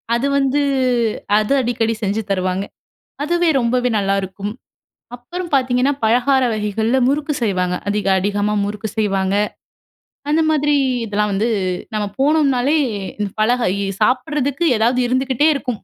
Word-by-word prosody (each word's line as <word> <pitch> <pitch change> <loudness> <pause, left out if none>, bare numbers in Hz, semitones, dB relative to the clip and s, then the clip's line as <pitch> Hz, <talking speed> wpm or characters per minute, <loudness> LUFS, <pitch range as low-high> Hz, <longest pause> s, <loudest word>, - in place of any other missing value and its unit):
அது 245 +4 0
வந்து 275 +1 +1 0.8
அது 215 +5 0
அடிக்கடி 230 -2 0
செஞ்சு 205 +2 0
தருவாங்க 185 0 -1 0.6
அதுவே 345 +1 +1
ரொம்பவே 250 +1 +1
நல்லாருக்கும். 195 0 -2 0.6
அப்புறம் 345 +9 -7
பார்த்தீங்கன்னா 255 +1 +2
பலகார 250 +4 +3
வகைகள்ல 220 +3 0
முறுக்கு 295 +2 0
செய்வாங்க. 185 -5 0
அதிக 205 -1 -1
அதிகமா 205 +2 0
முறுக்கு 210 +1 -4
செய்வாங்க. 195 -2 0 0.9
அந்த 315 +2 +3
மாதிரி 295 -1 +2 0.3
இதெல்லாம் 210 -1 -1
வந்து 205 +4 0 0.5
நம்ம 210 -1 -1
போனோம்னாலே 280 -1 +2 0.6
பழக 240 +3 +2 0.4
சாப்பிடுறதுக்கு 275 +3 0
ஏதாவது 240 +3 +2
இருந்துகிட்டே 260 +3 +1
இருக்கும். 250 -6 -4
240 Hz, 115 wpm, -19 LUFS, 205-275 Hz, 0.9 s, பலகார